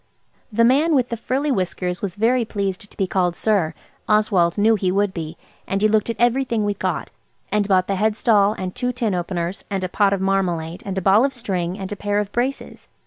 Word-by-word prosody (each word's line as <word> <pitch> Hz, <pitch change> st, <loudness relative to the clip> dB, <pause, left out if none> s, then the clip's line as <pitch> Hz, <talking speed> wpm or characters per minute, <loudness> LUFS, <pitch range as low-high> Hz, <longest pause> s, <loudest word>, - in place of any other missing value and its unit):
The 230 Hz, +2 st, +2 dB
man 290 Hz, +7 st, +4 dB
with 250 Hz, -3 st, +2 dB
the 235 Hz, -, -2 dB
frilly 265 Hz, +6 st, -1 dB
whiskers 180 Hz, -4 st, -2 dB
was 190 Hz, -3 st, -3 dB
very 235 Hz, +4 st, +2 dB
pleased 200 Hz, -2 st, -3 dB
to -, -, -21 dB
be 195 Hz, -, +1 dB
called 180 Hz, -2 st, 0 dB
"sir"–Oswald 195 Hz, 0 st, 0 dB
knew 215 Hz, +2 st, +4 dB
he 190 Hz, -4 st, 0 dB
would 200 Hz, 0 st, +1 dB
be–and 165 Hz, +3 st, -6 dB
he -, -, +6 dB
looked 215 Hz, +1 st, +1 dB
at 230 Hz, -, -1 dB
everything 240 Hz, -2 st, +1 dB
we'd 205 Hz, -1 st, -2 dB
got, -, -, -2 dB, 0.4 s
and 210 Hz, -1 st, +1 dB
bought 185 Hz, -2 st, +3 dB
the 195 Hz, 0 st, -2 dB
head 215 Hz, +1 st, +1 dB
stall 210 Hz, -3 st, +3 dB
and 185 Hz, -3 st, -5 dB
two 250 Hz, 0 st, -1 dB
tin 235 Hz, -4 st, -1 dB
openers, 175 Hz, 0 st, -3 dB
and 195 Hz, -2 st, -2 dB
a -, -, 0 dB
pot 200 Hz, +1 st, +2 dB
of 200 Hz, -, 0 dB
marmalade, 180 Hz, -4 st, -1 dB
and 195 Hz, -1 st, -3 dB
a -, -, 0 dB
ball 200 Hz, +5 st, +5 dB
of 275 Hz, 0 st, +1 dB
string, 190 Hz, -7 st, -3 dB
and 190 Hz, -1 st, -6 dB
a -, -, -2 dB
pair 205 Hz, 0 st, -1 dB
of 205 Hz, -1 st, -1 dB
braces. 255 Hz, +3 st, -3 dB
205 Hz, 215 wpm, -21 LUFS, 185-225 Hz, 0.4 s, he